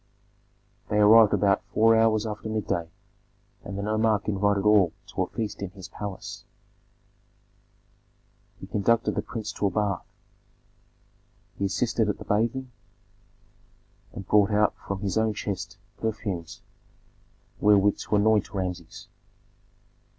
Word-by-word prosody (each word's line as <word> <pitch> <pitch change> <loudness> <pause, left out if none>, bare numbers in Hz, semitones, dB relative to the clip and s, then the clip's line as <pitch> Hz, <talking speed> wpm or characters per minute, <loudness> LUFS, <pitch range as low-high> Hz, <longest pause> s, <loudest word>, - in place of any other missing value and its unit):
They 105 - 0
arrived 105 +1 +7
about 100 -1 +2
four 115 +1 +5
hours 110 -1 +3
after 110 0 -5
midday, 100 -6 -2 0.7
and 100 - -6
the 100 - -3
nomarch 110 0 +1
invited 100 -1 +1
all 105 -5 +4 0.2
to - - -3
a - - 0
feast 105 -3 -5
in 100 - -3
his 95 -1 -11
palace. 100 -2 -7 2.2
He - - -8
conducted 115 +3 +1
the - - -1
prince 110 -3 -6
to 100 - -1
a - - +1
bath, 100 -3 -1 1.6
he 100 - 0
assisted 110 +3 0
at 105 - -1
the - - -10
bathing, 120 +5 -1 1.4
and 100 - -8
brought 105 -2 +4
out 105 0 +2
from 100 -1 -3
his 100 +1 0
own 110 -1 0
chest 100 -2 -5 0.2
perfumes 100 -6 -4 1.0
wherewith 105 -1 +4
to - - -1
anoint 105 0 +2
Rameses. 90 -3 -5
105 Hz, 125 wpm, -26 LUFS, 100-110 Hz, 2.2 s, arrived